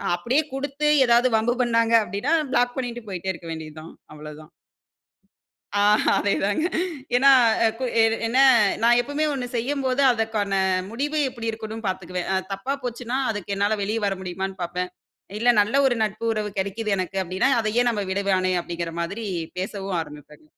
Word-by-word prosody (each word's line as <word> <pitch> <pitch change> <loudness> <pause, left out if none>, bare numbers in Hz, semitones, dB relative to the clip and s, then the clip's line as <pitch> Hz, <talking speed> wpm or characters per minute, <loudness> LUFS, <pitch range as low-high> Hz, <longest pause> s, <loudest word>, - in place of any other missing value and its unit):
அப்படியே 250 - +1
குடுத்து, 285 +2 -1 0.2
ஏதாவது 240 +2 +4
வம்பு 240 +2 0
பண்ணாங்க 230 -1 +2
அப்டின்னா, 205 - -2 0.2
ப்ளாக் 245 0 +1
பண்ணிட்டு 240 -2 -4
போயிட்டே 190 0 -3
இருக்க 170 -1 -11
வேண்டியது 155 -1 -8
தான். 160 - -12 0.2
அவ்ளோதான். 150 +1 -11 1.3
ஆ, - - +3 0.3
அதேதாங்க. 205 +5 0 0.5
ஏன்னா, 275 +2 +5 0.4
எ - - +6
கு 260 - -1 0.4
என்ன, 240 +3 -1 0.5
நான் 240 +1 +5
எப்பவுமே 285 +5 -2
ஒண்ணு 260 -3 -3
செய்யும்போது, 260 +2 -1
அதற்கான 220 -3 -2 0.4
முடிவு 290 +6 -2
எப்புடி 230 -3 -5
இருக்குண்ணும்ணு 220 0 -7
பார்த்துக்குவேன். 180 -1 -4
அ - - +2 0.2
தப்பா 195 +8 -3
போச்சுனா, 245 +1 -3
அதுக்கு 205 -2 -3
என்னால 205 +2 +1
வெளியே 215 +3 -1
வர 195 -1 0
முடியுமான்னு 190 +1 -5
பாப்பேன். 180 +1 -4 0.5
இல்ல, 245 +2 +3
நல்ல 210 +5 -1
ஒரு 255 -2 +3
நட்பு, 215 +1 -4
உறவு 210 -1 -3
கெடைக்குது 200 +2 -1
எனக்கு 185 +1 -3
அப்டீன்னா, 185 +9 0
அதை 215 -1 -1
ஏன் 245 - +2
நம்ப 210 -3 -2
விடவானே 190 -1 +1
அப்டீங்கிற 170 -1 -5
மாதரி 205 +6 -4 0.3
பேசவும் 195 -1 -3
ஆரம்பிப்பேன். 150 -1 -12
215 Hz, 155 wpm, -23 LUFS, 185-240 Hz, 1.3 s, எ